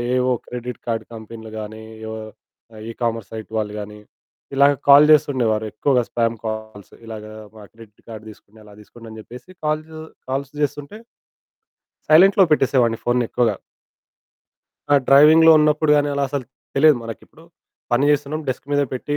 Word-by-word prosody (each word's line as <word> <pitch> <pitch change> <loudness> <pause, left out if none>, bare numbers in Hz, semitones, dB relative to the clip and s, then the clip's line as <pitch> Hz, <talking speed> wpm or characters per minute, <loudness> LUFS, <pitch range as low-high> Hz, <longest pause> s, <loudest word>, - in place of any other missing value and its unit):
ఏవో 125 0 +1
credit 125 -1 -7
card 115 -1 -2
కంపిన్లు 110 0 -10
గానీ, 110 +1 -8 0.2
ఏవో 110 0 -6 0.7
ఈ - - -4
కామర్స్ 115 -3 -3
సైట్ 110 -1 -8
వాళ్ళు 105 -1 -3
గానీ, 105 0 -9 0.6
ఇలాగ 140 +1 +5 0.2
కాల్ 145 +2 +8
చేస్తుండేవారు 120 -7 +2
ఎక్కువగా 130 +1 +1
స్పామ్ 115 -1 -1
కాల్స్. 110 -2 -7
"ఇలాగా 110 -1 -9 0.3
మా 105 - -12
క్రెడిట్ 110 -2 -18
కార్డ్ 110 -1 -10
తీసుకోండి, 105 +1 -18
అలా 105 -1 -16
తీసుకోండి" 115 +2 -15
అని 110 - -11
చెప్పేసి 125 +9 -13 0.2
కాల్సు 155 +1 -3 0.3
కాల్స్ 135 +1 -3
చేస్తుంటే 145 +5 -4 1.1
సైలెంట్‌లో 190 +5 +6
పెట్టేసేవాడిని 125 -6 +2
ఫోనుని 120 -1 +1
ఎక్కువగా. 120 -2 0 1.4
ఆ! - - +6
డ్రైవింగ్‌లో 155 +4 +7
ఉన్నప్పుడు 150 0 +2
గానీ, 145 0 +1
అలా 140 - -1
అసలు 140 -1 -4 0.3
తెలీదు 150 0 +5
మనకిప్పుడు 115 +7 -11 0.5
పని 120 +4 +2
చేస్తున్నాం, 145 +1 -1
డెస్క్ 130 - -4
మీద 145 0 +2
పెట్టి 145 +3 -3
125 Hz, 145 wpm, -20 LUFS, 110-145 Hz, 1.4 s, కాల్